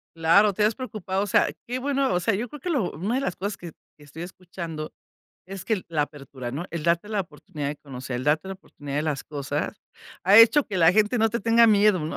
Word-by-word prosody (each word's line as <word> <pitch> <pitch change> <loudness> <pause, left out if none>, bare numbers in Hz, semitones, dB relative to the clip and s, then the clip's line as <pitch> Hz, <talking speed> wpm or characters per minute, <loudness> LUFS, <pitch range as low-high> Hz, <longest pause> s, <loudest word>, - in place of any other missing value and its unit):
Claro, 170 +6 +4
te 210 - 0
has 215 +2 +2
preocupado. 205 -6 -3
O - - -4
sea, - - +3 0.2
qué 250 +2 -3
bueno, 275 -3 0
o 180 - +2
sea, 195 +3 +1
yo 235 +5 -3
creo 295 +4 -10
que 355 - -5
lo 260 - 0
una 200 +9 -2
de 265 - 0
las 230 - -2
cosas 200 +1 -4
que 170 -2 -9 0.3
que 150 - -17
estoy 155 +4 -9
escuchando 170 -4 -7 0.6
es 195 -1 -8
que 220 - +1
el 185 - -6
la 160 -3 +1
apertura, 140 -4 -7
¿no?, 145 +7 -4
el 170 -3 -4
darte 170 +4 +1
la 210 -2 -1
oportunidad 150 -4 -6
de 150 - -4
conocer, 130 -3 -7
el 125 - -4
darte 155 +5 +1
la 190 - -4
oportunidad 145 -6 -8
de 150 - +1
las 150 -4 -2
cosas, 145 -2 -4 0.5
ha 195 +3 +6
hecho 235 +6 +8
que 200 - -4
la 165 -1 +6
gente 215 +4 +2
no 225 0 +3
te 235 +2 -2
tenga 230 +2 +5
miedo, 210 -3 +4
¿no?, 155 +1 -4
185 Hz, 250 wpm, -25 LUFS, 155-215 Hz, 0.6 s, hecho